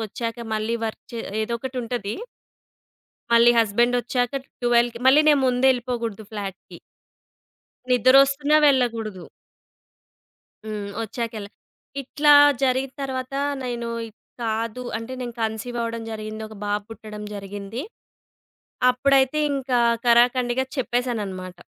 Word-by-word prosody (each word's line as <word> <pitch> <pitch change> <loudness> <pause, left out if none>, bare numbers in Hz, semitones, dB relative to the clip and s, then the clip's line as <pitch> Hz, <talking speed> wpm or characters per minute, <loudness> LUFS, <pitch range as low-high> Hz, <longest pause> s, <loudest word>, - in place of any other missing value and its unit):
కొచ్చాక 230 +2 -5
మళ్ళీ 215 +2 -1
వర్క్ 220 - -6
చే 230 - -4 0.2
ఏదో 235 +2 -2
ఒకటి 260 +2 -6
ఉంటది. 230 -3 -3 1.2
మళ్ళీ 235 +1 +7
హస్బండ్ 235 +3 +3
వచ్చాక 245 +2 -1 0.2
12కి 240 -1 +2
మళ్ళీ 275 +3 +7
నేను 295 -2 +5
ముందేళ్ళిపోకూడదు 245 -4 0
ఫ్లాట్‌కి. 200 -3 -7 1.1
నిద్రోస్తున్న 275 +4 +4
వెళ్ళకూడదు. 230 -8 +1 1.4
హ్మ్. 210 -2 -4
వచ్చాక 230 +1 -4
ఎల్ల 200 -1 -7 0.5
ఇట్లా 295 +3 +3 0.3
జరిగిన 260 0 +1
తర్వాత, 260 -1 -4 0.3
నేను 240 -1 -3 0.5
కాదు 230 +2 -2
అంటే 230 +3 -8
నేను 240 -2 -5
కన్సీవ్ 220 +2 -3
అవ్వడం 230 0 -3
జరిగింది. 215 0 -6
ఒక 220 - -12
బాబు 205 0 -1
పుట్టడం 215 -2 -9
జరిగింది. 200 +4 -6 1.1
అప్పుడైతే 270 +2 +2
ఇంకా 265 -2 0 0.3
కరాకండిగా 245 +1 +3
చెప్పేసానన్నమాట. 215 -8 -2
235 Hz, 105 wpm, -23 LUFS, 220-255 Hz, 1.4 s, మళ్ళీ